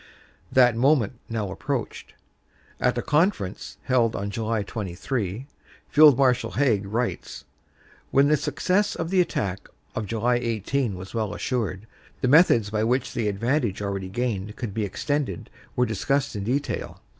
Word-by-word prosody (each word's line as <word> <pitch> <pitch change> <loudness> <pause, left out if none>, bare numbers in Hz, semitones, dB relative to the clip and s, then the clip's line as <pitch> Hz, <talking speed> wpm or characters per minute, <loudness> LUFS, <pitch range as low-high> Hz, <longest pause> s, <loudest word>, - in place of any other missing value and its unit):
That 125 -3 +5
moment 125 -2 +2
now 110 -4 -2
approached. - - -4 0.7
"At - - +1
a - - -1
conference 150 - 0
held 120 -4 +2
on 100 +1 -3
July 110 0 -1
23," 105 +3 -4 0.4
Field 150 -3 +7
Marshal 125 -8 +2
Haig 110 -5 +1
writes, 115 - -3 0.6
"when 140 +1 +4
the 150 - +4
success 155 +8 0
of 165 +1 -4
the 190 -1 +5
attack 100 - -3 0.2
of 105 - -3
July 115 +3 +1
18 115 0 -1
was 95 +1 -9
well 110 -3 -2
assured, 110 -5 -2 0.4
the - - +2
methods 125 - +5
by 110 0 0
which 125 +3 0
the 115 -4 -1
advantage 115 +1 0
already 100 -2 -3
gained 105 -2 -3
could 115 -5 -5
be 110 0 -1
extended 130 - -3 0.2
were 125 - +3
discussed 135 +5 -1
in 100 - -3
detail. 135 +5 -2
115 Hz, 145 wpm, -25 LUFS, 100-135 Hz, 0.7 s, Field